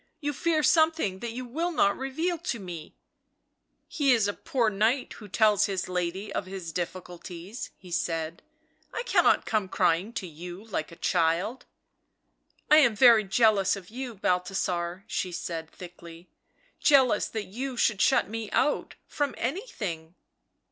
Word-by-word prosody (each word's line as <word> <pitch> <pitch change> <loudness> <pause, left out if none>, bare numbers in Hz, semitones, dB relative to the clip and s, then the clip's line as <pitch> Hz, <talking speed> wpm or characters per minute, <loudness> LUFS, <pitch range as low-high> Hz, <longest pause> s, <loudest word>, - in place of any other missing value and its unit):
"'You 290 -1 -2
fear 315 +2 +1
something 315 - +3
that 235 +1 -5
you 255 +1 -5
will 325 +9 -2
not 200 -11 +3
reveal 320 +6 -2
to 335 -7 -3
me 175 -5 -8 0.3
!" - - -50
" - - -49
He 290 -7 +2
is 225 -4 +2
a 205 - -1
poor 240 +1 0
knight 225 +6 +1
who 210 - -11
tells 210 0 +3
his 195 -2 -2
lady 180 +3 -3
of 185 - -3
his 185 -3 -6
difficulties," 180 +3 -6
he 180 -2 -14
said. 165 -1 -2 0.3
" 320 - -39
I 470 - -2
cannot - - +3
come 215 -3 0
crying 185 +3 +1
to 190 - -4
you 175 +3 -9
like 180 -8 -4
a - - -10
child." 175 +9 0 0.5
" - - -34
I 305 - +9
am 240 -8 +5
very 230 -1 +7
jealous 200 -1 +3
of 195 0 -11
you, 250 -1 -6
Balthasar," 180 -1 -1
she 185 - -3
said 165 -2 -5
thickly, 170 -1 -12 0.3
" - - -37
jealous 260 -7 +5
that 220 -2 -4
you 250 +5 -5
should 215 -3 +2
shut - - +4
me 220 0 -5
out 295 - +1
— - - -48
from 290 -2 0
anything." 200 - -4
205 Hz, 170 wpm, -27 LUFS, 180-255 Hz, 0.5 s, I